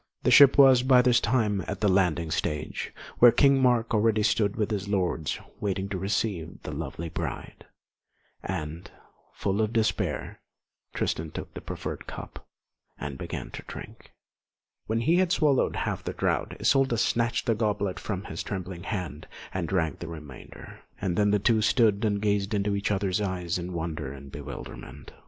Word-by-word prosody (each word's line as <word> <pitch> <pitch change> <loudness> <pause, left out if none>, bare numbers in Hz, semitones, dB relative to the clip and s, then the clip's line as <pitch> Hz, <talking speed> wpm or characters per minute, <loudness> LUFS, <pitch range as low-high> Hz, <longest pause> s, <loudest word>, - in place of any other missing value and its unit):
The - - +3
ship 140 -1 +8
was 135 -3 +8
by 125 -1 +5
this 125 -2 +5
time 110 -5 +1
at - - -4
the 105 - +3
landing 90 -4 +2
stage, 75 -1 -2 0.3
where 120 -1 +9
King 135 +2 +4
Mark 120 -2 +2
already 110 0 +3
stood 105 -1 +2
with 110 -1 -1
his 100 -1 -2
lords, 90 -6 -1 0.2
waiting 95 -1 -2
to 100 - -3
receive 95 -3 -2
the - - -5
lovely 85 - -5
bride; 80 - -6 0.7
and, 85 -1 -5 0.5
full 100 +2 0
of 110 0 0
despair, 110 -1 -1 0.5
Tristan 80 0 -1
took - - -7
the - - -7
proffered - - -6
cup - - -9 0.5
and 70 -2 -5
began - - -5
to - - -7
drink. - - -10 0.8
When 115 +1 0
he 165 +8 +3
had 185 -2 +2
swallowed 150 -6 +2
half - - -2
the - - -4
draught, - - -1
Isolda 135 -3 +3
snatched 115 +1 +1
the 115 - +3
goblet 105 -3 -1
from 100 -2 -4
his - - -5
trembling 95 -3 -5
hand 90 -6 -5 0.3
and 90 -3 -2
drank 80 -6 0
the 85 - -6
remainder; 75 -5 -10 0.2
and 95 -3 -1
then 105 +2 +3
the 105 - +4
two 110 +2 +2
stood 105 -2 +3
and 105 -2 +1
gazed 100 0 0
into 100 0 0
each 100 - -1
other's 100 0 0
eyes 90 -3 -2
in 90 +1 -5
wonder 80 -5 -4
and 70 0 -11
bewilderment. 70 -1 -9
100 Hz, 170 wpm, -27 LUFS, 85-115 Hz, 0.8 s, where